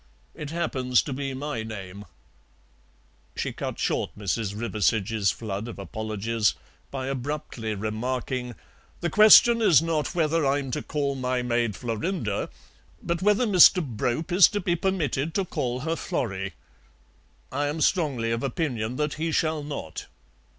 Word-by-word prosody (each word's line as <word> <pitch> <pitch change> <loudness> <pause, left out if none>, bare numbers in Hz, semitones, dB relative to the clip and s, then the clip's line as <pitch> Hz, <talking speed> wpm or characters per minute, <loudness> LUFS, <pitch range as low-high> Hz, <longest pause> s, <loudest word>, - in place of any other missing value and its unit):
It 150 - -7
happens 130 -7 +1
to 140 - -4
be 135 0 -4
my 140 -4 -3
name." 100 -2 -8 1.3
She - - -3
cut - - -5
short - - 0
Mrs. 105 0 -2
Riversedge's 110 -2 +1
flood 105 +2 -4
of 120 - -8
apologies 110 +2 -1 0.3
by 135 -1 -4
abruptly 130 -4 -4
remarking: 125 +4 -3 0.5
"The 170 -2 -1
question 220 +4 +8
is 180 -9 +6
not 165 +1 -1
whether 165 -1 +2
I'm 135 -1 0
to 150 - -2
call 145 -2 -2
my 130 -1 -1
maid 120 -3 0
Florinda, 115 - -2 0.5
but 170 +1 -2
whether 210 +5 +3
Mr. 185 -3 +7
Brope 125 - -2
is 180 +1 +8
to 205 - -2
be 175 -2 0
permitted 165 -5 -1
to 195 - +1
call 125 -6 -3
her 165 +3 -1
Florrie. 95 - -3 1.0
I 145 +2 -1
am 150 +2 -3
strongly 140 -9 +1
of 115 0 -1
opinion 125 -4 -2
than 150 +2 -1
he 160 +3 -2
shall 155 -1 +1
not." 145 - -6
130 Hz, 145 wpm, -26 LUFS, 115-160 Hz, 1.3 s, question